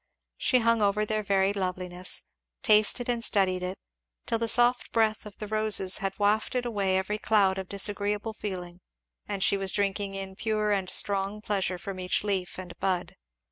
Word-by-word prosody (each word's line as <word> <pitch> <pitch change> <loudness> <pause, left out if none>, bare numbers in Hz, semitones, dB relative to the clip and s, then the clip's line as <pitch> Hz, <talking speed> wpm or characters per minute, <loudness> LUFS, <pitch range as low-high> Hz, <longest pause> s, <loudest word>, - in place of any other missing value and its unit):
She 255 - +2
hung 230 -1 +2
over 205 +1 +2
their 215 0 -1
varied 195 0 +1
loveliness, 180 -1 -3 0.4
tasted 215 +1 +4
and 240 -1 -1
studied 190 -5 +1
it, 180 +1 -4 0.5
till 230 - 0
the 230 - 0
soft 245 +1 +3
breath 220 -2 +1
of 205 - -13
the 215 - -6
roses 215 -3 +2
had 195 -1 -3
wafted 215 +4 +1
away 200 -5 0
every 210 +3 -2
cloud 195 -3 +2
of 190 - -7
disagreeable 205 +2 +1
feeling 180 -4 -6 0.5
and 200 -2 -2
she 200 - +3
was 195 -1 +1
drinking 200 -1 -1
in 195 -1 -6
pure 215 0 -1
and 195 -2 0
strong 200 +2 +1
pleasure 195 -4 -1
from 185 +1 -7
each 180 +1 0
leaf 195 -3 -2
and 180 -2 -8
bud. 185 -2 -1
200 Hz, 175 wpm, -27 LUFS, 190-215 Hz, 0.5 s, tasted